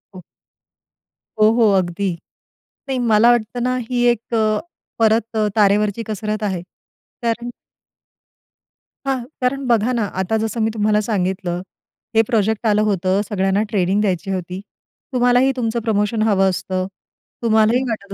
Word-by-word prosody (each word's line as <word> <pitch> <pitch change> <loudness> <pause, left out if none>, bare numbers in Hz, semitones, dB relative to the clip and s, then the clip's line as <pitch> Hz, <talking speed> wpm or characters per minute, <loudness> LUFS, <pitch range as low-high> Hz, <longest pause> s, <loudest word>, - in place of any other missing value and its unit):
हो. 180 - -10 1.2
हो, 215 0 +6
हो 230 -1 +4
अगदी. 185 +2 -1 0.8
नाही, 260 -1 -1
मला 220 +3 +6
वाटतं 240 +1 -1
ना, 255 0 0
ही 245 -1 0
एक 235 0 -6
अ, 215 -1 +2 0.4
परत 220 0 +3
अ, 215 - +2
तारेवरची 210 +1 +2
कसरत 215 0 -3
आहे, 190 -4 -1 0.6
कारण 235 +1 -1 1.6
हां, 270 -1 +1 0.2
कारण 265 +2 0
बघा 235 0 +2
ना, 230 -3 0 0.2
आता 220 +4 0
जसं 220 +1 -2
मी 220 - +2
तुम्हाला 210 -1 +2
सांगितलं, 185 -4 -2 0.5
हे 225 - +7
प्रोजेक्ट 220 -1 +1
आलं 210 0 +3
होतं, 195 -1 +1
सगळ्यांना 195 0 +1
ट्रेनिंग 195 -1 +1
द्यायची 195 -2 -1
होती. 180 0 -4 0.5
तुम्हालाही 245 +1 +3
तुमचं 235 -1 -1
प्रमोशन 215 0 0
हवं 195 -3 +3
असतं. 185 0 -2 0.6
तुम्हालाही 220 +2 +3
वाटत 200 -3 -5
215 Hz, 135 wpm, -20 LUFS, 195-230 Hz, 1.6 s, हे